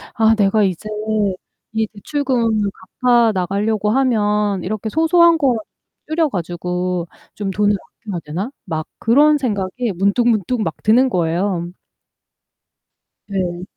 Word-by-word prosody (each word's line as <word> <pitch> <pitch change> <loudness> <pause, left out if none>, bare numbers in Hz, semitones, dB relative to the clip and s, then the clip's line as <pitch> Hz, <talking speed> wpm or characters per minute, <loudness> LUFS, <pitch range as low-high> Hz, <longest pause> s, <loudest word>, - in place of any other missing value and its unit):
아 225 0 +4
'내가 205 +1 +3
이제 195 +2 -2 0.8
이 220 0 0
대출금을 225 -2 -1 0.3
갚아 240 -2 +5
나가려고 205 +3 0
하면 210 -6 +1
이렇게 215 +3 -3
소소한 330 +3 +4
거 265 -6 +2 0.5
줄여 315 +1 +1
가지고 180 -1 -3 0.3
좀 205 -2 -3
돈을 205 +1 +2 0.3
아껴야 195 -5 -3
되나?' 180 - -4
막 155 -1 -4
그런 295 +6 +4
생각이 225 -2 -2
문득문득 215 +3 +1
막 165 -6 -2
드는 245 +5 +4
거예요. 175 -1 -1 1.6
네. 180 -3 -3
210 Hz, 240 characters per minute, -19 LUFS, 185-240 Hz, 1.6 s, 갚아